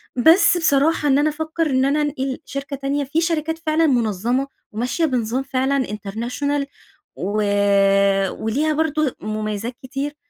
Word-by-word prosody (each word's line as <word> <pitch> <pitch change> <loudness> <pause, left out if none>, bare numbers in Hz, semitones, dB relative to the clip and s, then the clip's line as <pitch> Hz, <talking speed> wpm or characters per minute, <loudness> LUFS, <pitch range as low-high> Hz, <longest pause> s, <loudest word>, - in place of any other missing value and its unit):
بس 325 +8 +5
بصراحة 310 -1 +2
إن 275 -1 +4
أنا 300 +1 +3
أفكّر 315 +1 -2
إن 260 0 +2
أنا 290 +2 +1
أنقل 270 -3 -2
شركة 275 +1 -5
تانية، 280 +1 -2
في 290 +4 -1
شركات 325 -1 -1
فعلًا 315 +1 +3
منظمة، 240 +1 0 0.2
وماشية 245 +9 -1
بنظام 250 -2 -1
فعلًا 270 0 0
international 235 +8 -3 0.5
و 205 +3 -1 1.0
وليها 285 +8 +1
برضو 310 -1 +1
مميزات 215 +2 -4
كتير، 275 +3 -4
275 Hz, 135 wpm, -21 LUFS, 245-305 Hz, 1.0 s, بس